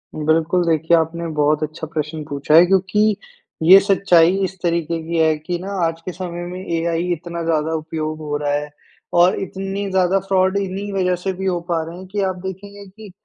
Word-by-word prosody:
बिल्कुल, 160 +3 +1
देखिए 160 +1 +3
आपने 165 +1 -2
बहुत 150 +1 +2
अच्छा 155 +1 -5
प्रश्न 155 0 -4
पूछा 145 +2 +1
है 170 - +9
क्योंकि 195 +3 +2 0.5
ये 185 +4 +9
सच्चाई 190 -3 +4
इस 190 0 -3
तरीके 170 -1 -1
की 170 0 -2
है 160 -1 +3
कि 175 +3 -4
ना 190 +3 -6
आज 165 0 -2
के 185 - -3
समय 175 -1 -6
में 180 +1 -6 0.2
एआई 170 +1 -1
इतना 170 0 -6
ज़्यादा 160 -1 0
उपयोग 155 0 -4
हो 150 -1 -3
रहा 145 -1 -2
है 150 0 -2 0.5
और 180 +2 +4
इतनी 195 +1 -4
ज़्यादा 190 +1 +2
फ्रॉड 190 0 +2
इन्हीं 200 +1 -3
वज़ह 180 -2 +1
से 190 - -1
भी 190 +1 -5
हो 180 -2 0
पा 165 -2 +1
रहे 180 +3 -9
कि 205 - -1
आप 185 - -4
देखेंगे 200 +2 -8
कि 205 0 -13
175 Hz, 195 wpm, -20 LUFS, 160-190 Hz, 0.5 s, है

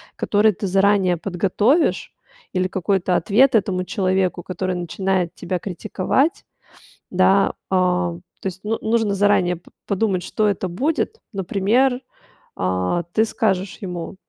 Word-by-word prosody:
который 210 +1 +3
ты 200 - -5
заранее 195 -1 +3
подготовишь, 200 - +1 0.4
или 185 -1 +1
какой-то 185 -1 0
ответ 220 +10 +4
этому 190 -3 +1
человеку, 185 -1 0
который 185 0 -3
начинает 180 0 -1
тебя 185 - -3
критиковать, 210 - -1 0.7
да. 190 +2 +3 0.2
А, 180 -2 +2 0.3
то - - -9
есть, 190 0 -4
ну 220 +2 -2
нужно 220 -2 +1
заранее 190 -3 +2
п 170 - -18 0.2
подумать, 195 -2 0
что 210 +3 0
это 195 -2 -1
будет. 300 - -1
Например, 215 +7 +1 0.6
а, 90 - 0
ты 220 - +4
скажешь 195 -4 -1
ему: 180 -2 -5
190 Hz, 125 wpm, -21 LUFS, 180-210 Hz, 0.7 s, ответ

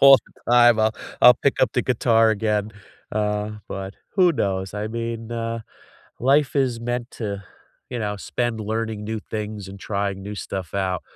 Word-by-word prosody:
all 135 -1 +9
the 120 - -5
time, 120 -2 +7
I'll 110 0 +3 0.3
I'll 125 - +11
pick 135 +1 +1
up 120 - +3
the 125 - +2
guitar 115 -2 +3
again, 105 0 0 0.4
uh, 105 0 -1 0.2
but 95 0 -5 0.2
who 180 -2 +6
knows, 95 -5 -1
I 105 +1 -2
mean, 115 0 -4
uh, 115 0 -2 0.6
life 140 +3 +3
is 130 -4 +1
meant 120 +1 -3
to, 100 -3 -4 0.5
you 125 - -4
know, 105 -1 -2
spend 120 +1 -2
learning 110 0 -2
new 110 0 -3
things 105 -2 -4
and 100 0 -10
trying 100 -1 -2
new 105 +2 -6
stuff 95 -2 -5
out. 95 -3 0
110 Hz, 170 wpm, -23 LUFS, 105-120 Hz, 0.6 s, I'll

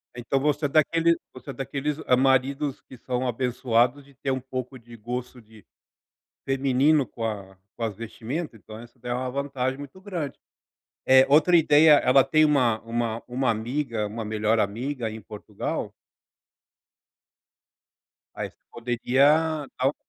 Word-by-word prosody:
Então, 125 +3 -1
você 150 +2 0
é - - +3
daqueles 165 +3 +3 0.2
você 130 +2 -12
é - - -4
daqueles 140 +2 -3 0.2
maridos 135 +2 +1
que 130 - -14
são 125 +1 -2
abençoados 125 +1 +1
de 140 - -20
ter 135 +1 -3
um 130 - -1
pouco 130 0 -6
de 120 0 -14
gosto 125 +2 -6
de 110 -2 -19 0.8
feminino 135 +2 +2
com 115 - -7
a 100 -3 -5 0.2
com - - -7
as 110 -2 -1
vestimento, 115 - -6
então 110 +1 -11
isso 120 +2 -16
dá 120 0 -4
uma 125 +1 -2
vantagem 135 -1 -2
muito 145 +6 -10
grande. 180 -7 -5 0.7
É 130 0 +7
outra 155 +5 +5
ideia. 155 0 +6
Ela 135 -2 +5
tem 155 +3 +3
uma 125 -7 +2
uma 115 0 -3
uma 125 +1 -1
amiga 115 0 -2
uma 110 +2 -5
melhor 110 +1 0
amiga 115 +4 -2
em 110 +1 -7
Portugal? 105 -1 -5 2.4
Aí - - -5
você - - -30
poderia 140 +6 +2
dar 130 - +2
o 145 - -6
130 Hz, 150 wpm, -25 LUFS, 115-140 Hz, 2.4 s, É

